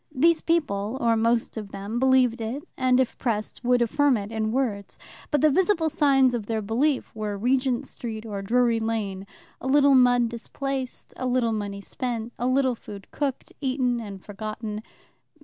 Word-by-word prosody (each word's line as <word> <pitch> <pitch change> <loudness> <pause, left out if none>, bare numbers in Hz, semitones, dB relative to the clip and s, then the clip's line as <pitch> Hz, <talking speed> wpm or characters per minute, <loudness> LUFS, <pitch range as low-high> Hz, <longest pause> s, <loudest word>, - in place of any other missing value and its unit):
These 330 +5 +3
people, 250 -9 0
or 230 -2 +3
most 230 +1 +1
of 210 -2 -5
them, 200 +4 -4
believed 255 -2 +3
it, 240 +7 -4
and 255 0 +3
if 260 - 0
pressed, 220 -1 -2
would 245 0 +3
affirm 275 +2 +2
it 205 +1 -6
in 220 -1 -1
words. 220 -6 -2 0.3
But 295 -3 +1
the 310 - +5
visible 340 -1 +2
signs 270 -4 +4
of 225 -4 -3
their 220 -2 -1
belief 255 +7 0
were 210 -2 -3
Regent 250 +3 +1
Street 220 -2 -6
or 205 -3 -4
Drury 235 +2 +2
Lane, 205 -4 -3 0.3
a - - -4
little 280 +1 +5
mud 245 -2 +5
displaced, 260 +3 -5
a 255 - -2
little 245 -2 +1
money 200 -2 -4
spent, 235 +1 -4
a 245 - 0
little 260 0 +2
food 205 -4 -11
cooked, 275 -3 -3
eaten, 255 -3 0
and 200 -4 -8
forgotten. 215 +1 -5
240 Hz, 170 wpm, -25 LUFS, 215-260 Hz, 0.3 s, the